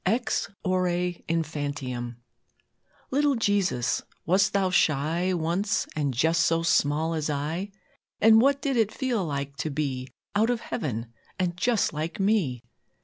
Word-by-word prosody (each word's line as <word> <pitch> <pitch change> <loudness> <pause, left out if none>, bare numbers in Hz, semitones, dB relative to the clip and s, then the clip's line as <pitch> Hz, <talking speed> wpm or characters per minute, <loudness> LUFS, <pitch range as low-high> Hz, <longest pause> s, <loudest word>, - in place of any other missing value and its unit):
EX 225 +6 0 0.2
ORE 185 0 +2 0.4
INFANTIUM 145 -7 -3 0.9
Little 285 +1 +3
Jesus, 200 - +1 0.2
wast 190 +4 +3
Thou 195 -2 +1
shy 165 +3 +2
Once, 180 +4 0
and 145 -3 0
just 160 +6 +2
so 165 +1 +2
small 160 0 +2
as 155 -1 -2
I? 155 +7 -2 0.5
And 220 0 +7
what 275 +2 +2
did 275 -3 0
it 220 -2 +2
feel 245 -7 -1
like 140 -3 -4
to 155 - -2
be 135 -3 -2 0.3
Out 220 +3 +3
of 240 -2 0
Heaven, 115 - -4 0.2
and 180 -2 -1
just 220 +2 +1
like 155 +6 -4
me? 190 - +1
165 Hz, 140 wpm, -26 LUFS, 145-205 Hz, 0.9 s, And